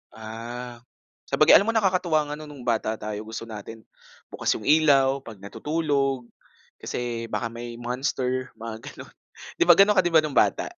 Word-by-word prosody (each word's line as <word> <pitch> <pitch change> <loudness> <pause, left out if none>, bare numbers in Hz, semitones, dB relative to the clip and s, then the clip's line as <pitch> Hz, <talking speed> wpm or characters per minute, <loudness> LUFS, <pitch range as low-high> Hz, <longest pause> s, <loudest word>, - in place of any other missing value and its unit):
Ah, 115 +2 -8 0.5
sabagay - - +4
alam 200 - 0
mo 230 - 0
nakakatuwa 175 -7 +1
nga - - -3
no'ng 150 -4 -10
bata 110 -2 0
tayo 105 0 -6
gusto 115 +1 -6
natin 110 0 -9 0.5
bukas - - 0
'yung - - -7
ilaw 140 -2 +4
'pag 115 -5 -11
natutulog 135 +5 -2 0.6
kasi 120 -1 -4
baka 115 0 -3
may 120 0 -7
monster 125 +1 -2
mga 115 -1 -7
gano'n. - - -11 0.5
Di - - +6
ba, 175 - +9
gano'n 200 +3 +5
ka 185 - +7
di 175 - 0
ba, 160 -1 +6
no'ng 150 -3 -4
bata? - - +2
125 Hz, 165 wpm, -25 LUFS, 115-150 Hz, 0.6 s, ba